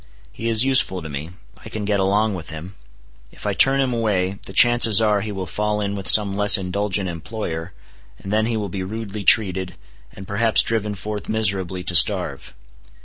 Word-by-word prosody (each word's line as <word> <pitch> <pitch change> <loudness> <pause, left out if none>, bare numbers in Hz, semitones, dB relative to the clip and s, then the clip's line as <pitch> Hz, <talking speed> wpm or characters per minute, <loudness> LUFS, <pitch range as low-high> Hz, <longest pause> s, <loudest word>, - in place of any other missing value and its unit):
He 115 - -5
is 115 +2 +5
useful 110 -9 +1
to 80 - -8
me. 75 +3 -7 0.3
I - - -12
can 105 -1 -6
get 100 -1 -1
along 100 +3 0
with 85 -4 -8
him. 80 +4 -9 0.6
If - - -13
I 105 - -1
turn 135 +7 +4
him 130 -2 -1
away, 100 -4 -2
the - - -8
chances 115 0 +5
are 105 -2 +1
he 105 +1 -6
will 95 -2 -6
fall 105 +3 -3
in 100 -1 -3
with 100 -2 -6
some 100 -2 +5
less 105 +1 +5
indulgent 95 +1 -3
employer, 85 -1 -7 0.5
and 95 - -8
then 110 +1 0
he 115 -1 -2
will 105 -2 -4
be 95 +1 -6
rudely 105 +1 -7
treated, 95 -3 +3 0.4
and 95 - -13
perhaps 110 +2 +1
driven 105 -2 -3
forth 105 +2 -7
miserably 95 -4 -1
to 90 - -2
starve. 85 - +3
100 Hz, 195 wpm, -20 LUFS, 95-110 Hz, 0.6 s, is